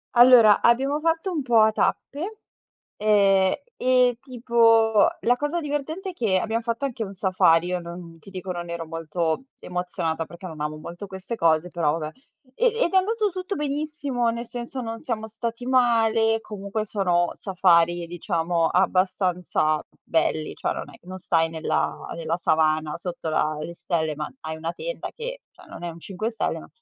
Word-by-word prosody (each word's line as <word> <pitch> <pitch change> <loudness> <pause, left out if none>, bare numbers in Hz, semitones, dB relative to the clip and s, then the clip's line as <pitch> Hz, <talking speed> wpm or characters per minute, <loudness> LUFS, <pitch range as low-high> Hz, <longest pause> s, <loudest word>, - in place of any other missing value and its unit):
Allora, 240 -4 +8
abbiamo 270 +5 +3
fatto 330 +4 0
un 315 - -1
po' 235 -3 +4
a 220 0 +6
tappe, 360 - -2 0.6
ehm, 200 -3 +4 0.2
e 250 -1 +3
tipo 230 -4 +4
la 245 +1 +3
cosa 295 +5 -1
divertente 310 +5 -3
è - - -8
che 215 - +1
abbiamo 225 +4 -1
fatto 230 +4 -2
anche 230 -4 -4
un 195 - -8
safari. 185 -3 +3
Io 180 0 -1
non 170 -1 -9
ti 195 - -14
dico, 185 0 -6
non 175 -1 -4
ero 170 -1 -4
molto 165 +3 -2 0.2
emozionata 175 -2 -3
perché 170 +3 -10
non 160 -3 -8
amo 150 0 -2
molto 170 +5 -8
queste 190 +4 -6
cose, 165 0 +2
però 165 -3 0
vabbè. 155 -1 -5 0.4
E - - +1 0.2
ed 345 - -1
è - - +5
andato 425 +3 +2
tutto 370 +2 -4
benissimo, 285 -4 -1
nel 235 +1 -5
senso 245 +2 -6
non 225 -1 -5
siamo 225 -6 -3
stati 230 +2 -5
male, 225 -3 +3
comunque 210 0 -4
sono 180 -4 +1
safari, 175 -3 +2
diciamo, 170 -1 0
abbastanza 180 -4 +1 0.2
belli. 160 -1 0
Cioè - - -2
non - - -5
è - - -14
non 185 0 -7
stai 165 -2 +1
nella 160 0 -2
nella 165 0 -2
savana 155 -2 +1
sotto 175 -2 -5
la 155 -1 +1
le 170 +3 -6
stelle, 160 -3 -1
ma 150 0 -4
hai 160 0 -5
una 165 +1 -4
tenda - - -5
che, - - -6
cioè, 365 0 -18
non - - -10
è 175 - -3
un 165 - -11
5 210 +6 -4
stelle, 225 - -2
ma - - -13
195 Hz, 175 wpm, -24 LUFS, 170-245 Hz, 0.6 s, Allora